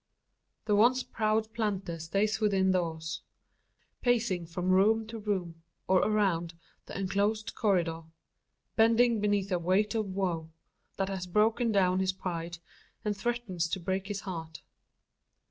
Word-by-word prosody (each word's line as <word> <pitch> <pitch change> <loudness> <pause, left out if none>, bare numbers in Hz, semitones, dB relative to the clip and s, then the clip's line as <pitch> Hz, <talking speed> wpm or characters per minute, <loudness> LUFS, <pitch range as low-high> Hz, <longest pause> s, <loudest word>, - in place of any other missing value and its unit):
The 210 -1 +2
once 245 +5 +4
proud 220 0 0
planter 195 -7 -2
stays 195 +6 0
within 195 -3 +3
doors 160 -3 -2 0.8
pacing 225 -8 +1
from 180 +2 -1
room 215 +4 +4
to 225 +1 -7
room, 185 -6 -3 0.3
or 190 -1 +5
around, 180 -6 +1 0.3
the - - -6
enclosed 205 +3 0
corridor 175 -6 +1 0.7
bending 230 +1 +4
beneath 205 -1 +1
a 180 - +2
weight 190 +5 +2
of 220 -2 -1
woe, 180 -4 -2 0.5
that 195 0 0
has 190 -2 -4
broken 220 +5 +2
down 185 -2 +3
his 190 0 +1
pride, 170 -2 -4 0.5
and 210 -1 0
threatens 195 -6 -2
to 190 - -2
break 190 +2 -2
his 205 -1 -4
heart. 165 -4 -7
195 Hz, 135 wpm, -30 LUFS, 175-215 Hz, 0.8 s, or